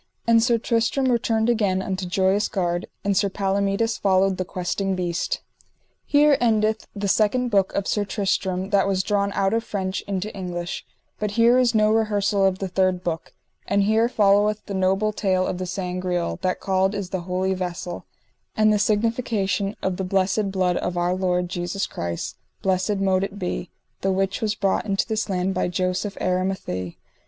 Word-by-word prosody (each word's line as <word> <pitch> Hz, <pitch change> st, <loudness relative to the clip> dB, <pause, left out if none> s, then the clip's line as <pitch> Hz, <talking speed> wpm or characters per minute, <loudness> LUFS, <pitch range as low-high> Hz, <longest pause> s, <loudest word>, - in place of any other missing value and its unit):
And 230 Hz, -1 st, +5 dB
Sir 235 Hz, 0 st, +3 dB
Tristram 230 Hz, +3 st, +1 dB
returned 225 Hz, -2 st, +1 dB
again 205 Hz, -6 st, +2 dB
unto 190 Hz, -1 st, -3 dB
Joyous 190 Hz, +2 st, +2 dB
Gard, 175 Hz, -2 st, -1 dB, 0.2 s
and 200 Hz, -1 st, +1 dB
Sir 200 Hz, +1 st, +2 dB
Palomides 200 Hz, +3 st, 0 dB
followed 190 Hz, -1 st, +2 dB
the 185 Hz, -, -2 dB
Questing 190 Hz, +1 st, -2 dB
Beast. 175 Hz, -2 st, -2 dB, 0.7 s
_Here 290 Hz, -1 st, +5 dB
endeth 220 Hz, -2 st, +1 dB
the 200 Hz, 0 st, -2 dB
second 225 Hz, +5 st, +2 dB
book 195 Hz, -2 st, +3 dB
of 200 Hz, -, 0 dB
Sir 210 Hz, -, +1 dB
Tristram 190 Hz, -1 st, -1 dB
that 200 Hz, -1 st, +3 dB
was 190 Hz, -1 st, +1 dB
drawn 200 Hz, 0 st, 0 dB
out 195 Hz, +1 st, +1 dB
of 225 Hz, 0 st, +1 dB
French 190 Hz, -3 st, -3 dB
into 200 Hz, +1 st, -3 dB
English. 175 Hz, -2 st, -5 dB, 0.3 s
But 210 Hz, -, -1 dB
here 235 Hz, +2 st, +5 dB
is 240 Hz, -2 st, +2 dB
no 215 Hz, 0 st, +4 dB
rehersal 205 Hz, -2 st, +2 dB
of 190 Hz, -1 st, 0 dB
the 195 Hz, -, -3 dB
third 185 Hz, 0 st, +1 dB
book. 165 Hz, -2 st, -3 dB, 0.4 s
And 200 Hz, 0 st, +2 dB
here 220 Hz, +3 st, +3 dB
followeth 210 Hz, -1 st, +3 dB
the 200 Hz, -, -6 dB
noble 195 Hz, +3 st, +1 dB
tale 185 Hz, -3 st, +1 dB
of 180 Hz, -, -3 dB
the 185 Hz, -, -3 dB
Sangreal, 180 Hz, -, -2 dB
that 185 Hz, -, 0 dB
called 190 Hz, +1 st, +1 dB
is 200 Hz, -3 st, -4 dB
the 190 Hz, -, -2 dB
Holy 185 Hz, +1 st, 0 dB
Vessel; 175 Hz, -1 st, -5 dB, 0.5 s
and 215 Hz, 0 st, +4 dB
the 210 Hz, -, +2 dB
signification 215 Hz, -2 st, 0 dB
of 185 Hz, -1 st, -1 dB
the 190 Hz, -, -2 dB
blessed 195 Hz, +2 st, +1 dB
blood 185 Hz, -2 st, +1 dB
of 180 Hz, 0 st, -2 dB
our 175 Hz, +1 st, +1 dB
Lord 180 Hz, -1 st, 0 dB
Jesus 175 Hz, +3 st, -2 dB
Christ, 85 Hz, 0 st, -5 dB, 0.3 s
blessed 190 Hz, +2 st, +1 dB
mote 190 Hz, -1 st, +2 dB
it 200 Hz, +1 st, -4 dB
be, 180 Hz, -2 st, -3 dB, 0.3 s
the 195 Hz, -, +1 dB
which 195 Hz, +1 st, -1 dB
was 215 Hz, -1 st, 0 dB
brought 200 Hz, +1 st, 0 dB
into 195 Hz, -1 st, 0 dB
this 220 Hz, -1 st, -2 dB
land 185 Hz, 0 st, 0 dB
by 185 Hz, -, 0 dB
Joseph 185 Hz, +3 st, -2 dB
Aramathie. 185 Hz, -, -2 dB
195 Hz, 180 wpm, -23 LUFS, 185-210 Hz, 0.7 s, And